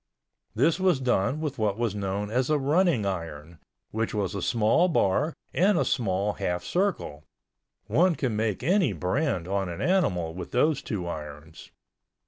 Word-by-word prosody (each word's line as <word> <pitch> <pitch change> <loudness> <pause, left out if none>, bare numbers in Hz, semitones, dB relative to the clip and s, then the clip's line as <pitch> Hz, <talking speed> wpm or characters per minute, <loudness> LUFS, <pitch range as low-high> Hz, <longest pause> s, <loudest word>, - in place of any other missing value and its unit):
This 155 - +2
was 185 -6 +3
done 125 +3 0
with 150 -5 -3
what 105 -2 0
was 115 -3 -1
known 100 +1 -3
as 125 +3 0
a 155 - +3
running 145 - +2
iron, 85 -4 -5 0.3
which 110 0 -2
was 100 -4 -1
a 100 - -3
small 115 - +3
bar 150 - +1 0.2
and 190 +2 +3
a - - +2
small 100 -4 0
half 90 -2 -2
circle—one 160 - -2
can 125 -7 -1
make 110 0 -1
any 175 - +2
brand 90 - -1
on 95 -1 -1
an 85 - -6
animal 100 - +1
with 90 +1 -7
those 145 +3 +2
two 95 -5 -4
irons. 75 0 -8
110 Hz, 155 wpm, -27 LUFS, 90-150 Hz, 0.3 s, was